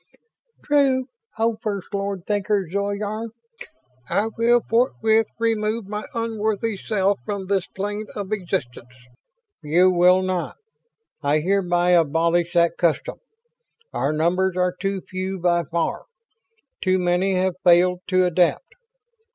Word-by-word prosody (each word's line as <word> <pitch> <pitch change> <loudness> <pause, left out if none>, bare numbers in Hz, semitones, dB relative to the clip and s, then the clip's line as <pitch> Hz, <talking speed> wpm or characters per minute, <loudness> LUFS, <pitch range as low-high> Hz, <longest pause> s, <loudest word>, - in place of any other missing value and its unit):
"True, 270 -3 +2 0.3
oh 225 0 +1
First 205 -3 -4
Lord 200 -2 -3
Thinker 205 -2 0
Zoyar. 205 +4 -3 0.8
I 215 +2 +1
will 235 +1 +3
forthwith 225 -2 +2
remove 225 -1 0
my 210 +1 -5
unworthy 220 -1 -1
self 200 0 0
from 200 +6 -4
this 190 -1 0
plane 205 +2 -4
of 205 -1 -5
existence." 175 - -3 0.7
"You 170 +5 +3
will 180 +1 +4
not! 185 -2 -3 0.6
I 145 0 +2
hereby 180 -1 +1
abolish 170 +1 +2
that 170 -1 +2
custom. 170 -3 0 0.7
Our 140 - 0
numbers 180 +4 +1
are 180 0 +1
too 195 +1 -3
few 185 +1 -4
by 175 -1 +1
far. 170 0 -2 0.8
Too 185 -1 +2
many 180 +2 +1
have 185 0 +1
failed 180 +1 +4
to 185 -1 +3
adapt. 180 - +1
190 Hz, 120 wpm, -22 LUFS, 175-210 Hz, 0.8 s, will